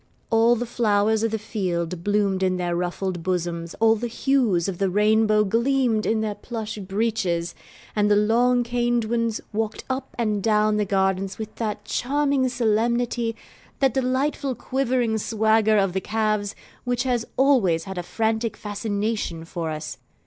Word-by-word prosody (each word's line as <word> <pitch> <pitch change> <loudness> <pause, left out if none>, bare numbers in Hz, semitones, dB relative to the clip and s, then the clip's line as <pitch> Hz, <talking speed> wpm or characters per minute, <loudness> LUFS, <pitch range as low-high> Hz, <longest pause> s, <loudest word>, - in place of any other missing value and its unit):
All 230 +1 +5
the 240 +1 -2
flowers 220 -2 +1
of 225 - +1
the 220 - -1
field 180 -5 -3
bloomed 205 -2 +1
in 185 -1 +1
their 175 -1 -1
ruffled 180 0 -2
bosoms, 170 -1 -2
all 225 0 +4
the 240 +2 -3
hues 235 -8 +1
of 185 -3 -4
the 195 -1 +2
rainbow 215 +2 +3
gleamed 235 +1 +1
in 220 0 +1
their 215 -1 -1
plush 220 -1 -6
breeches, 195 -4 -1 0.4
and 210 -1 +2
the 205 - +5
long 240 +4 +3
caned 240 -1 0
ones 230 -1 -1
walked 220 0 -2
up 260 +1 -4
and 215 -4 0
down 215 0 +2
the 210 - +1
garden 190 0 +1
with 220 -1 -6
that 210 -2 -3
charming 280 0 +1
solemnity, 235 0 0 0.4
that 270 -2 +2
delightful 265 +1 0
quivering 250 -4 0
swagger 220 0 +2
of 195 -3 +2
the 190 - -1
calves, 215 -1 -1 0.3
which 245 0 0
has 245 -3 0
always 230 -12 +3
had 190 -2 -6
a - - -1
frantic 220 +4 -1
fascination 205 -4 -3
for 165 -1 -4
us. 155 0 -5
220 Hz, 155 wpm, -24 LUFS, 195-235 Hz, 0.4 s, All